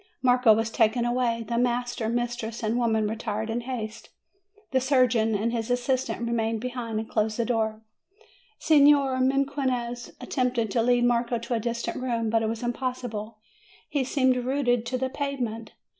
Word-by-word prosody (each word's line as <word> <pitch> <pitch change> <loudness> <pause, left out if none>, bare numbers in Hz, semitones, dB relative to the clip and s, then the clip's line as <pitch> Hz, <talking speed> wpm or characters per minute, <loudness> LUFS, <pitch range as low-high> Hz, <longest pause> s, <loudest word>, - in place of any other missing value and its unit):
Marco 250 -2 +5
was 225 +1 +2
taken 230 +1 +2
away. 240 -2 0
The 235 0 0
master, 245 -2 0
mistress, 240 -1 -3
and 220 +1 0
women 220 -2 +1
retired 220 0 -3
in 235 +2 -1
haste; 230 -3 -6 0.6
the 260 -1 +2
surgeon 245 -5 +3
and 220 +3 0
his 230 -1 -2
assistant 245 -1 0
remained 225 -1 0
behind, 240 -2 -4
and 220 - -5
closed 215 -1 0
the 235 - 0
door. 220 -2 -1 0.7
Signor 285 -3 +4
Mequinez 260 -3 0
attempted 245 -4 -1
to 230 - +2
lead 245 +1 +3
Marco 240 0 +1
to 235 +2 -4
a 230 - +1
dis 235 +1 -3
tant - - -3
room, 230 -3 -1
but 225 0 +3
it 220 - 0
was 225 +1 -4
impossible; 240 -3 -4 0.5
he 290 -3 0
seemed 260 -1 +2
rooted 245 -2 0
to 255 - -1
the 260 +1 -1
pavement. 250 -6 -4
240 Hz, 165 wpm, -26 LUFS, 225-255 Hz, 0.7 s, Marco